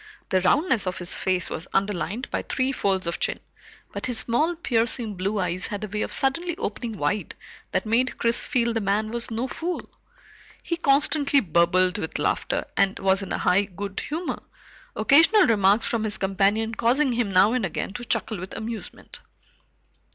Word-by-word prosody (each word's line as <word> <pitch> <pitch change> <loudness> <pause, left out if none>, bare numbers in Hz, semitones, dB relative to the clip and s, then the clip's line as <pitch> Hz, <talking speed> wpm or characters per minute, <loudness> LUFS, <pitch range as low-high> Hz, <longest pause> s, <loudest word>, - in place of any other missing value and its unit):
The 185 - +2
roundness 230 - +2
of 185 0 -2
his 175 -1 0
face 185 -2 0
was 160 - -5
underlined 200 - -1
by - - -1
three 260 0 -1
folds 195 -7 0
of 170 - -3
chin, - - -1 0.5
but - - -3
his 245 -2 -1
small 305 +11 +1
piercing 230 -6 +2
blue 195 +3 -2
eyes 180 -1 -1
had 205 0 -5
a - - -3
way 210 +1 -3
of - - -3
suddenly 335 +6 0
opening 240 - -4
wide 195 +2 -2 0.3
that - - -1
made 240 +4 +1
Chris 230 0 +2
feel 235 -2 +1
the 225 - -1
man 210 +2 0
was 235 0 -3
no 230 +3 -2
fool. 340 +6 -4 0.8
He 340 - -2
constantly 285 -2 +3
burbled 180 - +2
with 160 - -4
laughter - - -1
and 195 0 +2
was 190 0 +2
in 195 - -7
a - - 0
high 185 +3 +2
good 195 0 -6
humor, 325 +4 -4 0.5
occasional 325 - +5
remarks 205 -1 +3
from 230 -2 -1
his 215 -1 0
companion 200 +3 +1
causing 255 +5 +2
him 235 -3 0
now 195 +4 +5
and 250 -2 0
again 190 +1 -3
to 240 - -6
chuckle 220 -3 -2
with 185 +1 -7
amusement. 220 0 -6
215 Hz, 180 wpm, -24 LUFS, 190-255 Hz, 0.8 s, occasional